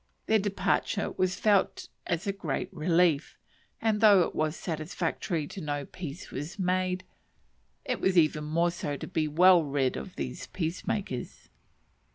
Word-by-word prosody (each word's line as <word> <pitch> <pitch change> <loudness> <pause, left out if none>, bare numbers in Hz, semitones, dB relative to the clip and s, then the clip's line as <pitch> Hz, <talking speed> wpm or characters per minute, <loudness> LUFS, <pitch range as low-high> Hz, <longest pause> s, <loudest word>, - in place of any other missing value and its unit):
Their 220 0 +3
departure 200 +1 0
was 185 0 0
felt 205 -3 +2 0.2
as 175 0 -1
a 200 - 0
great 165 -8 -3
relief; 165 -1 +2 0.4
and 220 -1 +1
though 205 -4 +7
it - - 0
was 155 +1 0
satisfactory 165 0 -3
to 190 - -8
know 145 -2 -3
peace 170 0 -8
was 145 +8 -6
made, 185 -1 0 0.8
it - - -2
was 190 -1 +2
even 155 -2 +3
more 170 +3 +1
so 145 -4 -4
to - - -6
be 155 -1 -1
well 175 +3 +6
rid 140 -3 0
of 65 - -7
the 65 -2 -4 0.2
peacemakers. 175 - -3
170 Hz, 150 wpm, -29 LUFS, 150-190 Hz, 0.8 s, though